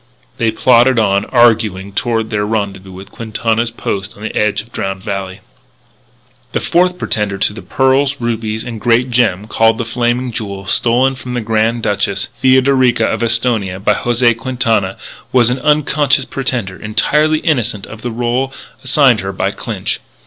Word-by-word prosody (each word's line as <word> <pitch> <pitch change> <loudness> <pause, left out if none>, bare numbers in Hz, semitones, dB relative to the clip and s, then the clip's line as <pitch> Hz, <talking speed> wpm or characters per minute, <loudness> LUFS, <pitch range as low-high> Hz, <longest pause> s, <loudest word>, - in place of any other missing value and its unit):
They 115 - +2
plodded 125 +3 +4
on, 100 -2 +2
arguing, 110 -6 +2
toward 115 +1 -1
their 105 -1 0
rendezvous 100 -3 -3
with 95 +2 -11
Quintana's 115 +1 -1
outpost 100 -3 -5
on 105 - -11
the 110 - -5
edge 105 0 0
of 115 - -23
Drowned 95 -3 -4
Valley. 95 -2 -5 1.1
The - - +1
fourth 180 +1 +1
pretender 105 - -2
to 105 - +1
the 110 - -9
pearls, 135 +1 +1
rubies, 110 -2 -2
and 115 -3 -7
great 120 +1 +2
gem 115 -5 +1
called 110 0 +2
the 115 - -3
Flaming 120 +2 -1
Jewel, 100 -3 -5
stolen 125 +6 +2
from 125 -1 -7
the 125 - -1
young - - -10
Grand 115 +1 0
Duchess 100 0 -1
Theodorica 130 -3 +3
of 110 - -1
Esthonia 115 -5 +1
by 105 +1 +2
José 120 +1 +2
Quintana, 115 -5 -1 0.3
was 120 -2 +4
an 130 - -2
unconscious 150 0 +2
pretender, 120 -8 -4
entirely 150 +9 +2
innocent 120 -10 -1
of 110 - -11
the 120 - -3
rôle 120 +3 -1 0.3
assigned 130 -3 +4
her 95 0 -4
by 95 - -1
Clinch. - - -4
115 Hz, 165 wpm, -15 LUFS, 105-125 Hz, 1.1 s, plodded